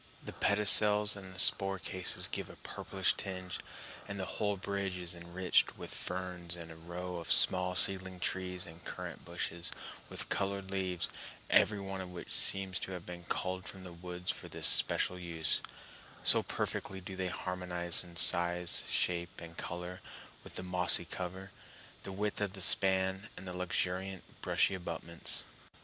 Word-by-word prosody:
The - - -7
pedicels 105 0 +6
and 95 -2 -7
spore 95 +1 +6
cases 95 +1 +2
give - - -4
a - - -12
purplish - - -1
tinge, 90 -1 -5 0.5
and 100 0 -6
the 95 - -2
whole 105 +1 -2
bridge 100 -1 -3
is 90 0 -5
enriched 85 +1 0
with - - -8
ferns 90 -1 -4
and 85 -1 -10
a - - -11
row 90 +2 -7
of 85 - -5
small 90 0 +4
seedling 95 -1 0
trees 90 0 -1
and 85 0 -14
currant - - -7
bushes 85 0 -5 0.4
with - - -4
colored 100 -1 -2
leaves, 95 -3 -1 0.4
every 105 -1 +4
one 95 -1 -5
of 95 - -8
which 90 -1 -8
seems 95 -1 +1
to 95 - -5
have 90 -2 -8
been 90 -1 -9
culled 95 +1 -2
from 95 -1 -8
the 90 -1 -10
woods 90 +1 -3
for - - -9
this - - +1
special 90 - +5
use, 85 -3 0 0.6
so - - +7
perfectly 95 - -4
do 95 +1 -8
they 95 0 -2
harmonize 90 -2 -1
in 85 -1 -14
size, 85 0 +2
shape, 85 0 -1
and 85 0 -10
color 90 +2 -6 0.4
with - - -12
the - - -5
mossy 90 -1 +3
cover, 95 +2 -7 0.5
the - - -7
width 105 +2 -3
of 100 -2 -2
the 95 - -5
span, 95 +2 +5
and 95 - -9
the 90 - -6
luxuriant, 90 +1 -2 0.2
brushy - - +1
abutments. 85 -2 -2
90 Hz, 165 wpm, -32 LUFS, 85-95 Hz, 0.6 s, so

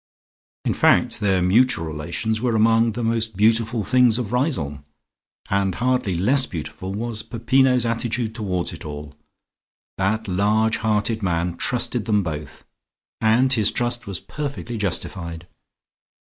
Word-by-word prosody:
In - - +1
fact - - +3
their 95 -4 +2
mutual 115 +1 +3
relations 85 +8 -3
were 120 -2 +1
among 115 +1 +3
the 120 - -4
most 115 -2 -1
Beautiful 115 +1 +2
Things 125 0 +4
of 120 -3 -4
Riseholme, 85 - 0 0.6
and 95 -2 0
hardly 125 -7 0
less 130 +9 +2
beautiful 95 +2 -6
was 110 +2 -2
Peppino's 125 +2 +2
attitude 115 0 -1
towards 95 -7 -2
it 85 - -9
all. 75 -1 -7 0.9
That 110 +3 0
large 105 +4 +2
hearted 110 +1 0
man 85 -2 -1
trusted 120 -1 -1
them 105 -2 +2
both, 75 -3 -6 0.5
and 120 +4 +3
his 110 -4 +3
trust 120 -1 -2
was 100 -3 -3
perfectly 140 -5 -5
justified. 85 -3 -4
110 Hz, 130 wpm, -22 LUFS, 95-120 Hz, 0.9 s, Things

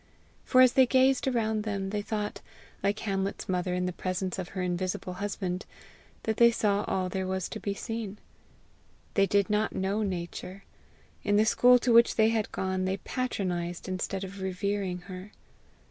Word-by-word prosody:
For 255 - +5
as 255 -1 +7
they 260 -1 +6
gazed 260 +1 +3
around 220 -4 +1
them, 200 -2 -3
they 210 0 -1
thought, 210 0 -3 0.4
like 200 +2 +1
Hamlet's 195 -2 -2
mother 180 -1 0
in 180 0 0
the 180 - -2
presence 185 +1 -3
of 180 0 -4
her 185 - 0
invisible 180 0 -2
husband, 190 -2 -3 0.6
that 220 -1 -1
they 235 0 +7
saw 210 -3 +1
all 185 -1 0
there 190 +1 -3
was 190 -1 -2
to - - -6
be 200 -1 -3
seen. 220 -2 -5 1.0
They 195 -1 +3
did 200 0 +2
not 210 +1 0
know 195 +3 0
nature: 185 0 -4 0.6
in 205 -1 +2
the 215 +1 +5
school 250 +3 +6
to 245 -1 +1
which 235 +1 +6
they 220 0 +4
had 225 -2 0
gone 190 0 -1
they 190 +1 0
patronized 180 -7 -3
instead 185 +1 -3
of 195 +1 -7
revering 190 -1 -2
her. 185 +3 -9
195 Hz, 175 wpm, -29 LUFS, 185-220 Hz, 1.0 s, as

